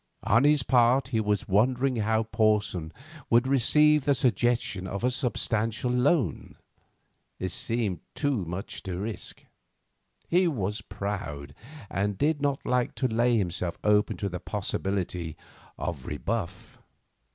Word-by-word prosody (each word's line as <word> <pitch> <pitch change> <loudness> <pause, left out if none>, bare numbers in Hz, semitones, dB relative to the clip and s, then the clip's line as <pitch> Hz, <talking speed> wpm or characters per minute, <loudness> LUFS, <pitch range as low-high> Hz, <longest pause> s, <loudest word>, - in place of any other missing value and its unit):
On 120 +5 +4
his 145 -2 +4
part 125 +1 +3
he 115 -4 0
was 105 -2 0
wondering 125 +6 +2
how 110 +1 +1
Porson 105 -7 0 0.4
would 120 +2 +4
receive 150 +3 +4
the 140 - +3
suggestion 120 -7 0
of 100 +4 -5
a 125 - +2
substantial 115 -1 0
loan. 125 - +1 0.8
It 95 - -3
seemed 115 -6 -1 0.2
too 140 -9 0
much 90 +4 -5
to 90 -2 -5
risk. 105 +3 -6 0.8
He 180 +1 +3
was 105 - -2
proud, 95 -10 -5 0.3
and 100 0 -1
did 150 0 +1
not 140 -1 -1
like 125 -1 0
to 130 - 0
lay 120 +1 +2
himself 90 -3 -2
open 105 0 +2
to 100 - -2
the 90 -2 -4
possibility 95 -4 -3 0.4
of 75 -7 -4
rebuff. 95 +5 -4
110 Hz, 130 wpm, -27 LUFS, 95-125 Hz, 0.8 s, On